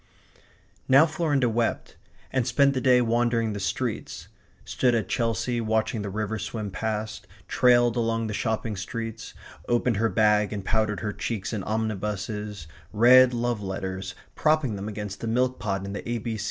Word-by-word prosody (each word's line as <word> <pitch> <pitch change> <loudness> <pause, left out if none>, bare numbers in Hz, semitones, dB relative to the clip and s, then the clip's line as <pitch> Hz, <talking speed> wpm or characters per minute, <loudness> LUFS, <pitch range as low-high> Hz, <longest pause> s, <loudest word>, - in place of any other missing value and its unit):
Now 135 +4 +7
Florinda 155 -6 0
wept, 115 0 -1 0.4
and 130 -2 +1
spent 140 +3 +3
the 130 - -1
day 125 0 +5
wandering 115 -1 +1
the 100 - -4
streets; 95 - -3 0.4
stood 125 -2 +1
at 110 - -1
Chelsea 115 0 0
watching 110 0 0
the 100 - -4
river 110 +2 -3
swim 105 0 -5
past; 110 +1 -4 0.2
trailed 120 -1 +4
along 115 -1 0
the 110 - -4
shopping 110 0 -2
streets; 115 +3 -6 0.3
opened 120 -2 +1
her 115 +2 +2
bag 105 -1 +3
and 100 -3 -5
powdered 110 -4 0
her 105 +1 -3
cheeks 110 0 -4
in 105 - -2
omnibuses; 105 -3 -3 0.3
read 125 +3 +7
love 120 -2 -1
letters, 95 -1 -5 0.2
propping 155 -7 +1
them 100 +1 -5
against 105 -2 -6
the 115 - -4
milk 125 +2 0
pot 100 -1 -2
in 100 - -5
the 100 - -4
A. 115 -2 -3
110 Hz, 160 wpm, -26 LUFS, 105-120 Hz, 0.4 s, Now